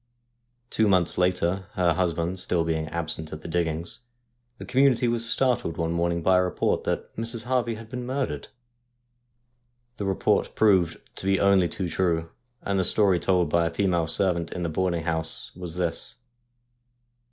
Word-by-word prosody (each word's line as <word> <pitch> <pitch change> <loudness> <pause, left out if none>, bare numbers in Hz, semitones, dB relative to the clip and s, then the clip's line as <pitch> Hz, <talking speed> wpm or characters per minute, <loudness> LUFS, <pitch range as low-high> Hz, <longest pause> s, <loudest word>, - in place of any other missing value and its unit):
Two 110 - +2
months 90 -4 +2
later, 90 +1 +1
her 90 -2 +2
husband 85 +1 -1
still 85 -2 0
being 80 -1 -1
absent 80 -1 -4
at 80 - -7
the - - -6
diggings, 85 +2 -2 0.6
the - - -8
community 130 -2 +3
was 115 0 +1
startled 125 -11 0
one 85 0 -1
morn 85 0 +1
ing 85 0 -2
by 95 +1 +4
a - - +3
report 90 - 0
that - - -3
Mrs. 115 0 -2
Harvey 120 -2 0
had 110 0 -10
been 125 +1 -5
murdered. 135 +1 -2 1.5
The 100 - -3
report 95 -1 +1
proved 95 -6 +3 0.2
to - - -6
be 95 0 +3
only 100 -3 +4
too 95 - -3
true, 85 -2 0 0.3
and 100 -1 0
the - - +2
story 95 -1 +3
told 90 -2 +1
by 85 -1 +3
a - - -3
female 85 -2 +1
servant 85 -1 +1
in 90 - -4
the 85 - -1
boarding 85 0 -1
house 80 -1 -2
was 90 -2 -6
this. 85 -2 -2
90 Hz, 170 wpm, -26 LUFS, 85-100 Hz, 1.5 s, by